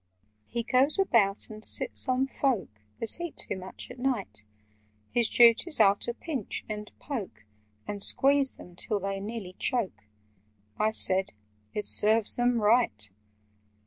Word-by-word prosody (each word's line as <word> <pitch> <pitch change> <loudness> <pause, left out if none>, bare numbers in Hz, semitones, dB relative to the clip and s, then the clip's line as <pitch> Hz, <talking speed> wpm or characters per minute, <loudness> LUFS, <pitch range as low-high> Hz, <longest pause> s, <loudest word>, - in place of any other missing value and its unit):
"He 235 0 -3
goes 260 - +2
about 225 - +1
and 215 0 -7
sits 285 - +3
on 255 +1 +2
folk 270 -5 -1 0.3
That 230 +9 +4
eat 345 -3 -6
too - - -3
much 190 +5 -9
at 250 - -12
night: 240 - -3 0.7
His 235 -2 +2
duties 240 +7 +5
are 200 -2 +6
to 235 - -5
pinch, 275 - -5
and 210 -1 -6
poke, 225 - -7 0.4
And 205 -1 -5
squeeze 275 +4 +2
them 180 - -14
till 205 +3 -2
they 195 0 -4
nearly 205 -2 -7
choke." 190 - -2 0.7
(I 215 - +2
said 190 -3 +2 0.4
"It 210 - -3
serves 215 +1 +3
them 245 -1 +1
right!") 210 - +1
225 Hz, 145 wpm, -28 LUFS, 200-255 Hz, 0.7 s, are